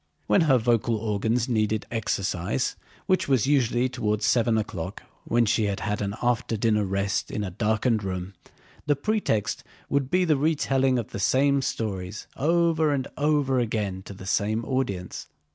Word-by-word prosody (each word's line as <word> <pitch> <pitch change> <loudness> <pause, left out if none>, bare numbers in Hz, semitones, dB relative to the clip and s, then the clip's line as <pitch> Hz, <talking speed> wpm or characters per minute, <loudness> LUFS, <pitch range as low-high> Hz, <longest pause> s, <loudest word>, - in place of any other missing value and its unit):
When 200 - +4
her 130 - +6
vocal 115 -1 +1
organs 110 +2 0
needed 110 -3 0
exercise, 100 -1 -1 0.3
which 185 -1 +1
was 130 -6 +3
usually 130 -3 +2
toward 110 -4 -2
seven 115 0 +3
o'clock 95 -3 -4 0.2
when 120 0 +2
she 110 0 +2
had 100 -1 -2
had 105 -1 -2
an 100 0 -2
after 120 -2 0
dinner 105 -1 +2
rest 100 +1 -1
in 105 - -3
a 95 - -4
darkened 110 +3 +1
room, 95 0 -4 0.5
the 145 - +4
pretext 140 - -1 0.3
would 140 -2 +1
be 180 +3 +2
the 155 -4 +3
retelling 135 -3 +2
of 115 - -4
the - - -5
same 140 +6 +3
stories 105 -5 -3
over 160 0 +2
and 135 -2 -1
over 145 -3 +2
again 105 -5 -2
to 100 - -9
the 95 - -10
same 110 +3 0
audience. 100 -9 -3
115 Hz, 160 wpm, -26 LUFS, 105-135 Hz, 0.5 s, her